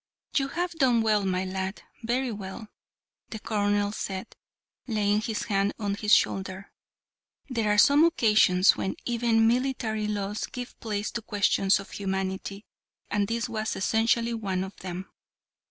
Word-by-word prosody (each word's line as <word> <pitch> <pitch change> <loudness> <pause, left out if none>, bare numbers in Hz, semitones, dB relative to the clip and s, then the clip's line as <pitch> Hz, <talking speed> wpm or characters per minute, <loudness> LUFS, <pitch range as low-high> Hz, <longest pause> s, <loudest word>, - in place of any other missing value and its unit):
"You 270 -1 +2
have 350 +5 -2
done 255 -8 +2
well, 215 -2 +2
my 185 0 0
lad 190 +1 -4 0.2
very 245 +2 -1
well," 210 +1 -7 0.6
the 220 - -5
colonel 205 -1 0
said, 195 0 -5 0.5
laying 210 -2 +1
his 220 -1 -2
hand 200 -2 0
on 205 -3 -2
his 210 +1 -2
shoulder. 190 -1 +2 0.8
"There 225 -4 +1
are 210 - +2
some 285 +8 +6
occasions 210 - +4
when 190 - -3
even 230 -2 +2
military 235 -3 0
laws 205 0 -2
give 245 -1 -8
place 210 -2 -3
to 235 - -4
questions 200 -2 +2
of 195 - -10
humanity, 190 +1 -3 0.5
and 205 -1 +1
this 230 +2 -1
was 220 -2 -3
essentially 230 +3 +1
one 195 -5 -2
of 190 +1 -8
them. 185 0 -6
210 Hz, 145 wpm, -27 LUFS, 195-230 Hz, 0.8 s, some